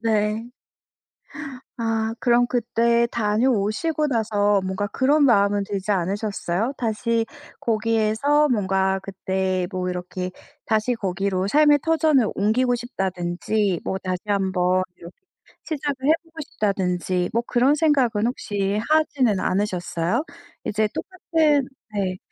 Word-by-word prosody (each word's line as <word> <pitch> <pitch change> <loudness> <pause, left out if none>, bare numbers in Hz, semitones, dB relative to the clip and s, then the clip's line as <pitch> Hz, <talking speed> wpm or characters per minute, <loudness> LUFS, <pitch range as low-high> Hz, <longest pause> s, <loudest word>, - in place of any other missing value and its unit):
네. 220 +1 0 1.3
아 225 -1 -1
그럼 245 -1 +3
그때 235 -1 +2
다녀오시고 230 +7 +1
나서 205 -5 +1
뭔가 190 +2 -2
그런 285 +7 +3
마음은 200 -4 +3
들지 200 0 -3
않으셨어요? 200 +4 -1
다시 230 0 0 0.3
거기에서 225 +6 +2
뭔가 190 -3 +1
그때 190 -1 -2
뭐 185 -1 -2
이렇게 180 0 -4 0.3
'다시 220 +2 +1
거기로 195 -3 -1
삶의 295 +4 +5
터전을 310 -7 +3
옮기고 245 +5 +2
싶다.'든지 190 -3 -2
뭐 190 - -2
'다시 185 -1 -2
한번 185 -2 +1
이렇게 170 +1 -12 0.5
시작을 285 -3 -3
해 310 - +7
보고 325 -1 -26
싶다.'든지 180 -3 -1
뭐 235 - +2
그런 255 +5 +3
생각은 265 -9 +2
혹시 205 -4 -2
하지는 280 -9 +2
않으셨어요? 185 - -1 0.4
이제 215 +1 0
똑같은 315 -7 +1 0.3
네 190 -3 -1
215 Hz, 265 characters per minute, -23 LUFS, 190-245 Hz, 1.3 s, 해